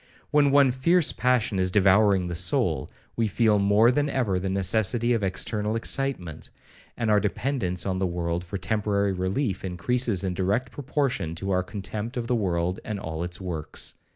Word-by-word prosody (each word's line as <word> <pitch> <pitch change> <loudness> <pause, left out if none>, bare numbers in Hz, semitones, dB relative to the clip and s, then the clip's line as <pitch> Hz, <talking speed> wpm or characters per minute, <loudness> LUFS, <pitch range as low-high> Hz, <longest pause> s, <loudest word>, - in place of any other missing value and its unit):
When 145 -1 +4
one 140 -1 +5
fierce 160 +6 +2
passion 120 -5 +1
is 95 0 +2
devouring 100 0 +4
the 85 - -4
soul, 85 0 0 0.3
we 115 -1 +1
feel 105 0 +2
more 100 +4 +4
than 145 +3 0
ever 115 -9 0
the 95 +1 -3
necessity 110 +5 +1
of 115 - 0
external 105 +3 -1
excitement; 115 - -2 0.5
and 115 -3 0
our 105 - +5
dependence 105 -2 -2
on 95 -1 -1
the 95 - +1
world 85 0 -2
for 90 +3 -5
temporary 100 +1 0
relief 95 +3 -2
increases 100 +3 0
in 95 -2 -1
direct 100 +8 -1
proportion 130 - -2
to 95 +3 -4
our 90 0 +2
contempt 105 +5 -5
of 120 - -2
the 125 - -1
world 90 -4 -1
and 105 -2 -4
all 80 -4 -5
its 90 +1 -6
works. 80 -5 -3
100 Hz, 175 wpm, -25 LUFS, 90-120 Hz, 0.5 s, one